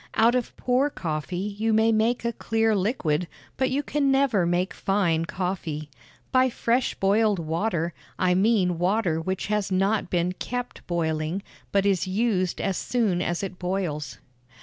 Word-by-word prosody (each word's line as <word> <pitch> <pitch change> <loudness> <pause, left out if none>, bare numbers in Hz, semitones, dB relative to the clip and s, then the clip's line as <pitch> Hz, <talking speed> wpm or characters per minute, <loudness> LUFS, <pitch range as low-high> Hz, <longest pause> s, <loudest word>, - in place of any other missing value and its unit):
Out 230 +2 +5
of 250 -2 -2
poor 255 +3 +2
coffee 160 - -4
you 210 +3 -1
may 220 +1 +4
make 225 +2 +1
a 235 - 0
clear 225 0 +1
liquid, 180 - 0 0.3
but 260 - +1
you 280 +2 0
can 285 -2 +1
never 270 -10 +3
make 175 +2 0
fine 175 -5 +1
coffee. 165 -5 -4 0.4
By 255 0 +4
fresh 240 +1 0
boiled 205 +1 +2
water, 170 +1 -1 0.2
I 180 -1 +2
mean 185 -3 +2
water 180 -3 +1
which 190 +3 -2
has 210 -2 -1
not 195 +1 +1
been 175 0 +1
kept 245 +6 -5
boiling, 160 +1 -1 0.3
but 200 -1 +2
is 195 -2 +2
used 190 -2 0
as 195 -2 -1
soon 215 -8 0
as 175 +1 -1
it 190 -2 -5
boils. 155 - -3
195 Hz, 155 wpm, -25 LUFS, 175-225 Hz, 0.4 s, Out